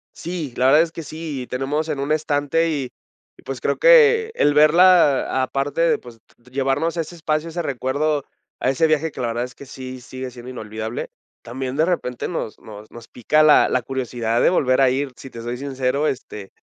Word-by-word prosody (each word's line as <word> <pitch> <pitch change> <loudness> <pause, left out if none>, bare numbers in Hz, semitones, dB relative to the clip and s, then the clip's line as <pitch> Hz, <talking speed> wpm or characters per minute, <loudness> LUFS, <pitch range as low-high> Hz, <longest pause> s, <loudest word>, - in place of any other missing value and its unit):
Sí, 165 -7 -5
la 125 - +2
verdad 150 +4 +6
es 165 - -1
que 165 - -7
sí, 150 -4 -6
tenemos 145 +5 -2
en 150 -3 -2
un 140 +2 -2
estante 155 +1 +1
y 140 -5 -2 0.5
y, - - -19
pues, - - -6
creo - - 0
que 465 -2 +6
el 145 - +3
verla 155 -3 +5
aparte 135 +3 -2
de, 170 - +3
pues, 120 -2 -14 0.3
llevarnos 135 +5 -1
ese 165 +1 -4
espacio, 155 -1 -2
ese 170 +1 -4
recuerdo, 140 +1 -1 0.3
a - - +1
ese 160 +5 +2
viaje 155 +1 +1
que, 130 - -7
la 120 - -1
verdad, 120 +1 -2
es 125 - -13
que 140 - -12
sí 130 -1 -9
sigue 130 +2 -7
siendo 125 0 -10
inolvidable, 110 -1 -6 0.3
también, 130 +2 -5
de 155 - +3
repente, 125 -9 -2
nos 165 -10 -5
nos 105 0 -12
nos 120 -1 -12
pica 150 +6 +1
la 155 -1 +6
la 130 - +1
curiosidad 120 -3 -2
de - - +5
volver 135 -6 +2
a 130 - +5
ir. 135 +2 -1
Si 135 - -11
te 115 - -9
soy 120 +1 -4
sincero, 135 +2 -1
este, 105 -7 -5
135 Hz, 200 wpm, -21 LUFS, 125-155 Hz, 0.5 s, verdad